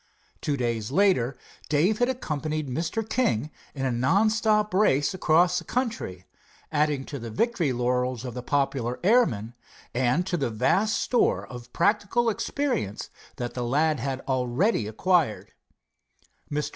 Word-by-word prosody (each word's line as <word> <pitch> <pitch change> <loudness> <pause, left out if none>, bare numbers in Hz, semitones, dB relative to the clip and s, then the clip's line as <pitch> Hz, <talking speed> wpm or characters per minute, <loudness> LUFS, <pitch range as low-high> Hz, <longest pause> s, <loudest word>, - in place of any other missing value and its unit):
Two 145 -2 -1
days 115 -4 -2
later 140 -7 +2 0.3
Dave 170 +9 +2
had 245 +1 +2
accompanied 155 - -3
Mr. 170 - -2
King 150 - 0 0.2
in 135 -1 -2
a 130 - +1
non 165 - +3
stop 210 -2 +1
race 185 -5 +3
across 180 0 +3
the - - -10
country, 220 - -3 0.5
adding 150 -3 +1
to 140 - -6
the 115 0 -6
victory 175 - 0
laurels 125 0 -1
of 125 - -5
the 125 - -5
popular 130 -2 -1
airman, 130 - +2 0.4
and 130 +7 +1
to 185 -2 -1
the 120 - -1
vast 160 - +1
store 245 - +1
of 125 -1 -10
practical 210 +5 +2
experience 235 - -2 0.2
that 120 -1 -4
the 125 - -4
lad 150 +4 +1
had 135 +1 -3
already 130 - 0
acquired. 160 - 0 1.0
Mr. 150 0 -1
145 Hz, 145 wpm, -26 LUFS, 125-200 Hz, 1.0 s, non